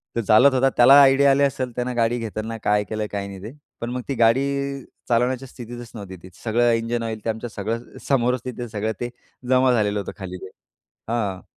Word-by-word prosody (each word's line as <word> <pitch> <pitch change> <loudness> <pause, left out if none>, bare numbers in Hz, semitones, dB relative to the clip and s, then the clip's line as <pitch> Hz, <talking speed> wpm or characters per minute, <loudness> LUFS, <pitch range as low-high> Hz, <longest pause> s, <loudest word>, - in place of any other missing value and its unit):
तर 115 - +1
चालवत 115 +7 +5
होता 130 +1 +3
त्याला 125 +3 +8
आयडिया 140 0 +5
आले 140 +1 +3
असेल 130 -2 -1
त्यानं 125 0 -2
गाडी 120 +1 +1
घेताना 110 0 -5
काय 105 0 +2
केलं 110 -1 -2
काय 100 -1 -3
नाही 95 -1 -9
ते. 110 - -7 0.3
पण 115 - -3
मग 125 +1 -3
ती 140 - -2
गाडी 115 +3 +4 0.7
चालवण्याच्या 125 +2 +1
स्थितीतच 120 -1 -10
नव्हती 100 -3 -8
ती. 95 - -11
सगळं 120 +1 +2
इंजिन 115 +1 -1
ऑईल 110 -2 -5
ते 115 - 0
आमच्या 110 +2 -4
सगळं 110 +4 -5
समोरच 125 -2 +1
तिथे 120 -1 -5
सगळं 110 +1 -2
ते 120 - -3 0.4
जमा 130 0 +4
झालेलं 105 -2 +1
होतं 100 - -5
खाली 90 -2 -7
ते - - -10 0.6
हां. 105 -6 -2
115 Hz, 200 wpm, -22 LUFS, 110-125 Hz, 0.7 s, त्याला